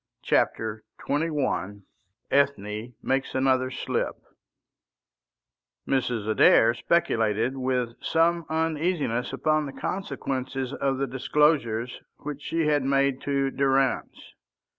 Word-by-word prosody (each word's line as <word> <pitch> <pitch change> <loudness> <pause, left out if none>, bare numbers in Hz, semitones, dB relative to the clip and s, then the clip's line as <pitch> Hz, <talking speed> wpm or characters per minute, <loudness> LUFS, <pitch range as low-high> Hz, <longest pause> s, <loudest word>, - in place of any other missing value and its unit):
CHAPTER 110 -1 0 0.2
XXI 140 - -1 0.5
ETHNE 120 -4 0
MAKES 135 0 -1
ANOTHER 130 -1 +2
SLIP 130 - -2 1.7
Mrs. 120 -5 0
Adair 115 +1 +5
speculated 115 -5 +1
with 125 -2 -1
some 165 0 +2
uneasiness 160 -6 -1
upon 155 +2 +1
the 135 - -8
consequences 135 -8 -3
of 135 -1 -1
the 140 - 0
disclosures 130 -3 +1 0.2
which 145 -1 -7
she 165 +2 -1
had 150 -1 +2
made 135 0 +1
to 140 -1 0
Durrance. 135 -1 0
135 Hz, 95 wpm, -26 LUFS, 120-150 Hz, 1.7 s, Adair